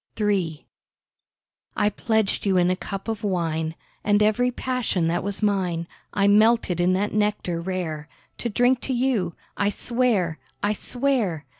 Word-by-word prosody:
III 190 -7 0 1.1
I 205 - +3
pledged 220 -1 0
you 190 -1 +3
in 180 0 +4
a - - +1
cup 195 +2 -6
of 225 -2 -3
wine, 165 -4 -1 0.3
And 205 0 +3
every 215 +4 +3
passion 250 -9 -1
that 175 +2 0
was 200 +2 -2
mine 185 -5 +1 0.3
I 200 0 +2
melted 215 -3 +4
in 180 +1 +3
that 200 +3 0
nectar 210 -5 0
rare, 170 -4 -4 0.3
To 240 - -1
drink 245 +3 +2
to 265 - -2
you, 240 -9 0 0.2
I 200 - +2
swear—I 205 - -1
swear! 230 - -1
200 Hz, 145 wpm, -24 LUFS, 175-220 Hz, 1.1 s, in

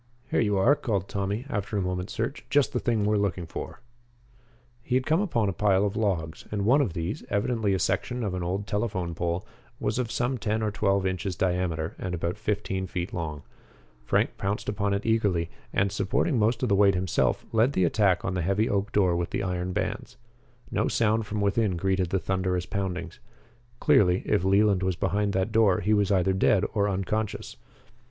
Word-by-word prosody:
"Here - - +2
you 105 -3 +2
are," 120 +10 +5
called 100 -9 -2
Tommy, 100 +5 -2
after 105 -5 -3
a - - +1
moment's 90 +1 -3
search. 115 +5 -3
"Just 145 -2 +2
the - - +1
thing 115 -4 0
we 105 - +2
are - - +2
looking 95 -3 -1
for." - - -7 1.0
He 125 - -2
had 130 0 +1
come 160 +4 +2
upon 120 - 0
a 95 - -1
pile 100 +1 +2
of 100 0 -2
logs, 85 -8 -2
and 100 -2 -1
one 135 +6 +5
of 105 -12 -1
these, 85 +1 -3
evidently 105 -2 +1
a - - +1
section 125 +6 -1
of 100 -4 -2
an 90 - -3
old 95 +4 -2
telephone 100 -5 -2
pole, 85 +3 -2 0.3
was 110 -2 -1
of 120 -2 -2
some 125 +1 -1
ten 110 +1 -1
or 105 - 0
twelve 100 -2 +1
inches 95 0 -2
diameter 90 -3 -1
and 90 -1 -3
about 85 +4 -3
fifteen 100 -3 -2
feet 90 0 -4
long. 75 -4 -4 0.6
Frank - - 0
pounced 100 +2 -2
upon 100 -1 -1
it 100 - -4
eagerly, 100 -7 +1 0.2
and, 100 0 +1
supporting 105 - 0
most 115 +3 +1
of 125 - +1
the 100 - +4
weight 100 -1 +5
himself, 90 -2 0
led 115 +5 +3
the 95 - +2
attack 95 +1 +2
on 95 - -1
the 90 - -1
heavy 100 +6 +1
oak 100 0 -1
door 95 -4 +3
with 85 0 -1
the - - -2
iron 90 -1 -2
bands. - - -3 0.5
No - - +1
sound 110 -1 +1
from 105 0 -2
within 100 -2 +1
greeted 95 0 0
the 95 - +1
thunderous 95 -1 -1
poundings. 95 -3 -4 0.6
Clearly, 90 -2 +4
if - - +1
Leland 100 0 +3
was 95 -1 0
behind 100 +3 0
that 95 +3 0
door, 110 -4 +4
he 105 +4 +2
was 105 -1 +2
either 95 0 +3
dead 95 +1 +3
or 105 -2 +1
unconscious. 100 +3 -2
100 Hz, 200 wpm, -27 LUFS, 90-110 Hz, 1.0 s, are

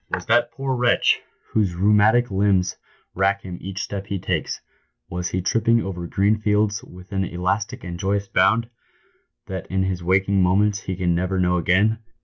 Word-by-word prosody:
"Was - - -3
that 120 0 +3
poor 135 -1 -2
wretch, 120 0 +3 0.3
whose 100 -5 +1
rheumatic 105 +5 +3
limbs 95 -2 +2 0.4
rack 100 +1 +1
him 90 -2 -7
each 95 0 -5
step 100 -1 -5
he 100 - -2
takes 90 - -2 0.3
— - - -51
was 90 +1 -3
he 90 0 -2
tripping 115 +3 +2
over 90 -2 -5
green 100 +4 +1
fields 105 -1 +1
with 90 +2 -14
an 95 -1 0
elastic 90 +4 -2
and 85 -1 -6
joyous 100 +1 -1
bound, 115 +4 +2 0.8
that 95 -2 -6
in 95 0 0
his 95 -2 -2
waking 95 +2 +2
moments 100 +3 +2
he 95 - -4
can 90 -1 0
never 90 +2 -1
know 90 0 +2
again 100 +6 +2
95 Hz, 175 wpm, -22 LUFS, 90-105 Hz, 0.8 s, that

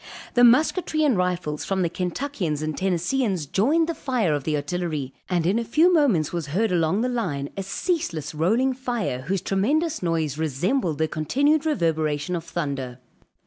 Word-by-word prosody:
The 245 - +4
musketry 310 +6 +4
and 280 -6 +3
rifles 180 -5 -1
from 190 -1 0
the - - +2
Kentuckians 180 - -3
and 155 -1 -2
Tennesseans, 185 - 0
joined 285 - +2
the 335 - -1
fire 245 - 0
of 145 -2 -2
the 155 - 0
artillery, 150 -2 -3 0.2
and 175 -3 +1
in 195 +6 +2
a - - -1
few 320 +10 +3
moments 235 - +2
was 170 -4 -3
heard 195 +9 0
along 170 +3 +1
the 250 - +1
line 180 - -2
a 195 - -3
ceaseless, 190 - -2
rolling 225 +12 +2
fire, 240 - -3
whose 190 0 0
tremendous 285 - 0
noise 160 -4 -1
resembled 160 - 0
the 160 +1 +1
continued 285 - +1
reverberation 160 - 0
of 165 - -4
thunder. 140 -7 -4
180 Hz, 170 wpm, -24 LUFS, 155-250 Hz, 0.2 s, The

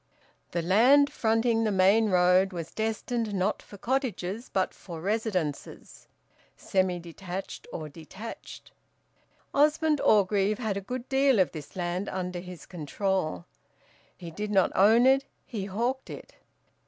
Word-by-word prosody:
The 170 -1 -2
land 255 - +5
fronting 225 0 +1
the 215 - +1
main 200 +3 +4
road 180 +1 +4
was 170 -2 -6
destined 220 0 -2
not 190 +2 0
for 205 - -13
cottages, 230 -3 -2
but 190 -1 0
for 170 -4 -9
residences, 190 -6 -3 0.5
semi 185 -2 0
detached 175 +2 -7
or 155 - -5
detached. 165 +9 -10 0.8
Osmond 300 +1 +3
Orgreave 205 0 +3
had 220 -5 -2
a 200 - -3
good 250 +5 -6
deal 270 -2 +3
of 185 -3 +3
this 155 -3 -9
land 180 +1 -2
under 180 -1 -4
his 180 -4 -10
control. 175 - -2 0.7
He 170 -2 -8
did 210 +5 -4
not 195 -3 +3
own 220 +5 +5
it, 270 +1 +5 0.2
he 210 -6 -5
hawked 235 +7 -2
it. - - -9
195 Hz, 135 wpm, -28 LUFS, 180-230 Hz, 0.8 s, land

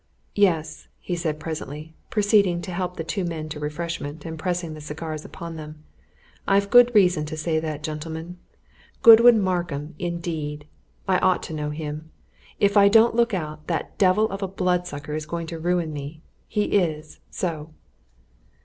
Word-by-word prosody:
"Yes!" 160 -6 +1
he 180 - -4
said 160 -3 -2
presently, 155 -1 -6 0.2
proceeding 205 -4 +3
to 185 - -6
help 180 0 -3
the 165 - -3
two 185 +4 -2
men 160 -3 -4
to 150 -1 -6
refreshment, 150 0 -5
and 160 -1 -6
pressing 175 -2 -2
the 155 - -9
cigars 155 +1 -6
upon 165 -1 -8
them, 155 0 -10 0.6
"I've 200 0 +2
good 245 -1 +7
reason 180 -6 +4
to 155 0 -6
say 160 0 0
that, 155 -2 -5
gentlemen! 160 +3 -6 0.6
Godwin 230 0 +9
Markham, 175 -5 -2
indeed! 165 -4 -4 0.4
I - - +3
ought - - +2
to - - -6
know 150 -1 -3
him! 150 +1 -6 0.5
If 200 0 +3
I 200 0 +7
don't 225 +3 +5
look 235 -3 +2
out, 155 -3 -6
that 165 -4 -3
devil 195 +3 +4
of 195 +1 -5
a 195 - -1
bloodsucker 180 -6 -2
is 155 0 -4
going 170 +1 -4
to 165 0 -6
ruin 175 -1 0
me 150 +3 -7 0.2
he 210 - 0
is, 155 -7 -1
so!" 160 -4 -4
165 Hz, 165 wpm, -24 LUFS, 155-185 Hz, 0.6 s, Godwin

